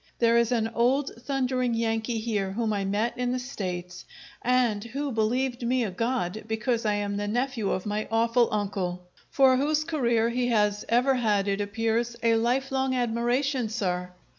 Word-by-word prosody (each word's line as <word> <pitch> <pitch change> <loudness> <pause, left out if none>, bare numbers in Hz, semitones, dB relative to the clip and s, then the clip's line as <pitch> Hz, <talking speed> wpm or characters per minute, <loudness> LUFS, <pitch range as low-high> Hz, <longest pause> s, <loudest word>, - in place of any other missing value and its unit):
There 235 -1 +3
is 235 0 +1
an 225 -2 +1
old 255 +5 +1
thundering 255 -3 0
Yankee 225 0 -1
here, 210 -4 -2
whom 225 0 -1
I 200 -1 -1
met 210 +4 0
in 245 0 0
the - - 0
States, 180 -8 -5 0.4
and 240 -4 +2
who 275 +4 -4
believed 245 +3 0
me 245 +1 +1
a 210 - -2
god 220 -1 -2
because 225 +1 -1
I 210 - +2
am 205 0 -2
the 205 0 -2
nephew 245 -1 -1
of 185 - -2
my 210 +1 -2
awful 230 +1 +3
uncle, 190 -4 -2 0.2
for 265 -2 +4
whose 300 +3 +1
career 240 -8 +1
he 245 0 0
has 210 -3 +1
ever 250 +3 +3
had, 210 -5 +1
it 200 0 0
appears, 225 +3 -1
a 230 0 +4
life 245 +4 +1
long 265 -1 0
admiration, 245 +1 0
sir! 180 -5 -2
230 Hz, 175 wpm, -27 LUFS, 210-250 Hz, 0.4 s, for